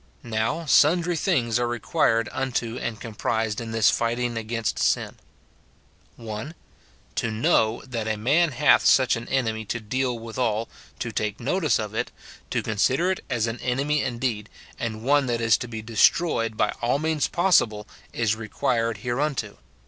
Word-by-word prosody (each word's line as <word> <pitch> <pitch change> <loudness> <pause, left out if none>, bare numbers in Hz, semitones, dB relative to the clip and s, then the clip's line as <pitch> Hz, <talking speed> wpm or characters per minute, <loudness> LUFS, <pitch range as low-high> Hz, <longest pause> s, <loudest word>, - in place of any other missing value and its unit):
Now, 115 +8 -1
sun 155 +4 +5
dry 175 +1 -1
things 125 - +1
are 120 - +1
required 115 -2 +1
unto 125 -3 -2
and 110 -3 -4
comprised 110 0 -2
in 115 - -6
this 115 0 +4
fight 115 0 0
ing 120 -1 -2
against 115 0 -2
sin: - - 0 0.5
— - - -35
[1.] 115 +7 -7 0.6
To 115 - 0
know 110 0 +1
that 115 -4 -4
a 110 -1 -1
man 150 +10 +3
hath 150 +4 +4
such 130 -2 +4
an 115 0 -6
enemy 110 -4 0
to 120 - -3
deal 125 +3 -1
withal, 115 -1 -2 0.3
to 115 - -4
take 105 -1 -2
notice 150 - +1
of 105 -1 -4
it, - - -2 0.4
to - - -1
consider 130 - +1
it 190 - -4
as 120 -4 0
an 115 0 -4
enemy 140 +4 0
indeed, 120 -4 -2 0.3
and 110 -1 -4
one 140 +1 +3
that 120 -1 0
is 115 -2 +4
to 125 - -6
be 110 -2 -6
destroyed 115 +1 +2
by - - +2
all 120 +3 +2
means 155 -3 0
possible, 115 - +2 0.2
is 110 -2 0
required 115 0 -1
hereunto. 125 -3 -2
115 Hz, 165 wpm, -25 LUFS, 110-135 Hz, 0.6 s, sun